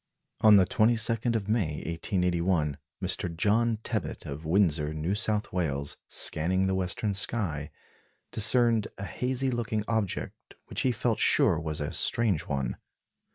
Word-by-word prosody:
On 110 Hz, -1 st, +7 dB
the 95 Hz, -2 st, +6 dB
22nd 115 Hz, 0 st, +2 dB
of 105 Hz, -3 st, -2 dB
May, 105 Hz, -9 st, 0 dB
1881, 85 Hz, -3 st, -1 dB, 0.2 s
Mr. 85 Hz, -2 st, 0 dB
John 110 Hz, +4 st, +2 dB
Tebbutt -, -, -3 dB
of 75 Hz, +3 st, -7 dB
Windsor, 80 Hz, -4 st, +1 dB
New 80 Hz, +5 st, -2 dB
South 105 Hz, -1 st, -1 dB
Wales, 70 Hz, -6 st, -2 dB
scanning 95 Hz, +4 st, +1 dB
the 95 Hz, -, 0 dB
western 95 Hz, +3 st, -1 dB
sky, 95 Hz, -7 st, -1 dB, 0.6 s
discerned 115 Hz, 0 st, +4 dB
a 100 Hz, -, -5 dB
hazy 130 Hz, +4 st, -1 dB
looking 115 Hz, -3 st, -2 dB
object 110 Hz, -5 st, -3 dB
which -, -, -3 dB
he 130 Hz, -, +2 dB
felt 115 Hz, -1 st, -1 dB
sure -, -, +4 dB
was 80 Hz, -2 st, -4 dB
a 75 Hz, -, -3 dB
strange 110 Hz, -9 st, 0 dB
one. 70 Hz, -3 st, -2 dB
100 Hz, 140 wpm, -28 LUFS, 80-115 Hz, 0.6 s, On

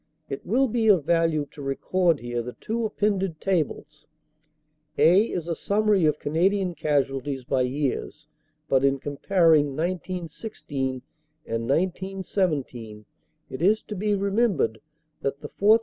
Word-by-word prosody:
It 135 Hz, -, -5 dB
will 260 Hz, +7 st, +2 dB
be 225 Hz, -1 st, 0 dB
of 185 Hz, -9 st, +5 dB
value 165 Hz, -2 st, +2 dB
to 150 Hz, -, -11 dB
record 165 Hz, +4 st, +1 dB
here 120 Hz, 0 st, -3 dB
the 125 Hz, +1 st, -7 dB
two 230 Hz, +1 st, -3 dB
appended 195 Hz, -6 st, -1 dB
tables. 155 Hz, -4 st, -2 dB, 0.9 s
"A" 185 Hz, +6 st, +6 dB
is 170 Hz, -2 st, -3 dB
a 170 Hz, -, 0 dB
summary 205 Hz, 0 st, +2 dB
of 150 Hz, -1 st, +1 dB
Canadian 180 Hz, +5 st, +1 dB
casualties 140 Hz, -3 st, -1 dB
by 130 Hz, +1 st, 0 dB
years, 135 Hz, +2 st, -2 dB, 0.4 s
but 135 Hz, 0 st, +3 dB
in 140 Hz, 0 st, +3 dB
comparing 150 Hz, 0 st, +2 dB
1916 165 Hz, -, -4 dB, 0.4 s
and 115 Hz, 0 st, -3 dB
1917 165 Hz, -, -2 dB, 0.5 s
it 130 Hz, -, -6 dB
is 210 Hz, +5 st, +3 dB
to 210 Hz, -, -7 dB
be 205 Hz, +2 st, 0 dB
remembered 195 Hz, -, +1 dB, 0.4 s
that 140 Hz, +1 st, -2 dB
the 150 Hz, -, -7 dB
4th. 215 Hz, +3 st, +4 dB
165 Hz, 135 wpm, -25 LUFS, 140-195 Hz, 0.9 s, A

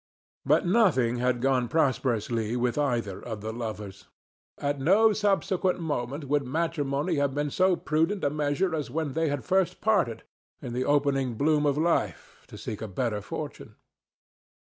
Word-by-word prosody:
But -, -, +4 dB
nothing 175 Hz, -, +3 dB
had 125 Hz, 0 st, 0 dB
gone 130 Hz, -2 st, +2 dB
prosperously 120 Hz, -6 st, 0 dB
with 120 Hz, 0 st, 0 dB
either 120 Hz, -9 st, -1 dB
of 110 Hz, -4 st, -6 dB
the 110 Hz, +1 st, -4 dB
lovers; 105 Hz, -4 st, -6 dB, 0.5 s
at 145 Hz, 0 st, -2 dB
no 205 Hz, +10 st, +4 dB
subsequent 195 Hz, -3 st, +1 dB
moment 145 Hz, -2 st, -3 dB
would 145 Hz, +1 st, +2 dB
matrimony 150 Hz, +2 st, -1 dB
have 140 Hz, -1 st, 0 dB
been 145 Hz, 0 st, -1 dB
so 185 Hz, +3 st, +3 dB
prudent 165 Hz, +6 st, 0 dB
a 140 Hz, -, +2 dB
measure 150 Hz, +4 st, 0 dB
as 150 Hz, -5 st, -2 dB
when 150 Hz, +1 st, -2 dB
they 160 Hz, +1 st, +1 dB
had 145 Hz, -2 st, -3 dB
first 190 Hz, -1 st, +1 dB
parted, 200 Hz, -, +1 dB, 0.4 s
in 120 Hz, -, -6 dB
the 125 Hz, +1 st, -1 dB
opening 140 Hz, -4 st, +1 dB
bloom 150 Hz, +3 st, +2 dB
of 145 Hz, 0 st, +1 dB
life, 165 Hz, +2 st, -1 dB
to -, -, -11 dB
seek 105 Hz, -, -6 dB
a 110 Hz, -, -4 dB
better 105 Hz, +1 st, -2 dB
fortune. -, -, -7 dB
145 Hz, 160 wpm, -27 LUFS, 120-165 Hz, 0.5 s, But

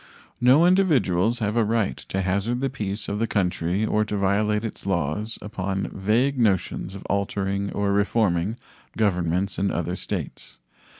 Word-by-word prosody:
No 130 Hz, +7 st, +6 dB
individuals 125 Hz, -, +3 dB
have 105 Hz, 0 st, 0 dB
a 115 Hz, -, +3 dB
right 110 Hz, -1 st, 0 dB
to 95 Hz, 0 st, -4 dB
hazard 100 Hz, +6 st, 0 dB
the 135 Hz, -1 st, -1 dB
peace 105 Hz, -5 st, -4 dB
of 105 Hz, -, -2 dB
the 115 Hz, -, +1 dB
country 90 Hz, 0 st, 0 dB
or 110 Hz, 0 st, +2 dB
to 105 Hz, 0 st, -3 dB
violate 105 Hz, +2 st, +1 dB
its 105 Hz, -, -6 dB
laws 95 Hz, +5 st, -1 dB
upon 95 Hz, -2 st, -3 dB
vague 120 Hz, +8 st, +1 dB
notions 95 Hz, -3 st, 0 dB
of 100 Hz, -, -9 dB
altering 100 Hz, 0 st, -1 dB
or 100 Hz, -1 st, 0 dB
reforming 100 Hz, -1 st, +1 dB, 0.4 s
governments 90 Hz, -2 st, 0 dB
in 100 Hz, +1 st, +1 dB
other 85 Hz, +1 st, -2 dB
states. -, -, -6 dB
100 Hz, 155 wpm, -24 LUFS, 95-110 Hz, 0.4 s, No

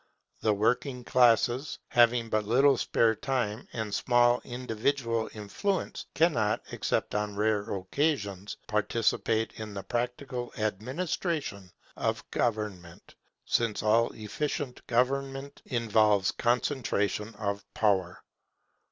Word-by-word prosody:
The 110 Hz, -2 st, +2 dB
working 125 Hz, +4 st, 0 dB
classes, 125 Hz, +3 st, +3 dB
having 120 Hz, -1 st, +4 dB
but 110 Hz, -1 st, +1 dB
little 135 Hz, +5 st, +5 dB
spare 115 Hz, -2 st, +2 dB
time 120 Hz, -2 st, -2 dB
and 110 Hz, -3 st, -4 dB
small 120 Hz, +1 st, +3 dB
individual 120 Hz, -1 st, -1 dB
influence, 145 Hz, -, -3 dB
cannot, 135 Hz, -9 st, +2 dB
except -, -, -1 dB
on 105 Hz, -1 st, -1 dB
rare 105 Hz, 0 st, 0 dB
occasions, 100 Hz, -, -1 dB
participate 110 Hz, +1 st, +1 dB
in 105 Hz, -2 st, -6 dB
the 100 Hz, -, -5 dB
practical 125 Hz, +2 st, -3 dB
administration 110 Hz, -, -2 dB, 0.3 s
of -, -, -2 dB
government, 105 Hz, -7 st, -3 dB, 0.3 s
since 115 Hz, -3 st, 0 dB
all 115 Hz, +2 st, +4 dB
efficient 125 Hz, +4 st, -3 dB
government 135 Hz, +3 st, -1 dB
involves 110 Hz, -4 st, +3 dB
concentration 115 Hz, -3 st, 0 dB
of 100 Hz, -1 st, -3 dB
power. 95 Hz, -5 st, +1 dB
115 Hz, 100 wpm, -29 LUFS, 105-125 Hz, 0.3 s, little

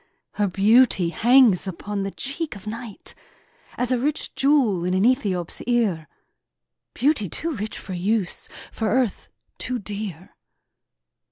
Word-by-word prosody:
Her 205 Hz, -1 st, 0 dB
beauty 200 Hz, -1 st, +4 dB
hangs 235 Hz, -1 st, +4 dB
upon 200 Hz, +3 st, -4 dB
the 195 Hz, -, -2 dB
cheek 280 Hz, -, -4 dB
of 200 Hz, 0 st, -12 dB
night 225 Hz, -1 st, -7 dB, 0.6 s
As 250 Hz, 0 st, 0 dB
a 250 Hz, -, +2 dB
rich 290 Hz, +4 st, -2 dB
jewel 265 Hz, -, +2 dB
in 180 Hz, +1 st, 0 dB
an 190 Hz, +3 st, +3 dB
Ethiop's 200 Hz, -9 st, 0 dB
ear; 210 Hz, -10 st, +1 dB, 0.9 s
Beauty 255 Hz, -, +1 dB
too 330 Hz, -, -2 dB
rich 215 Hz, 0 st, -5 dB
for 190 Hz, -, -7 dB
use, 190 Hz, +1 st, -1 dB, 0.2 s
for 220 Hz, -1 st, -2 dB
earth 240 Hz, -1 st, 0 dB, 0.3 s
too 255 Hz, -, -1 dB
dear! 200 Hz, -5 st, -6 dB
215 Hz, 135 wpm, -23 LUFS, 190-250 Hz, 0.9 s, beauty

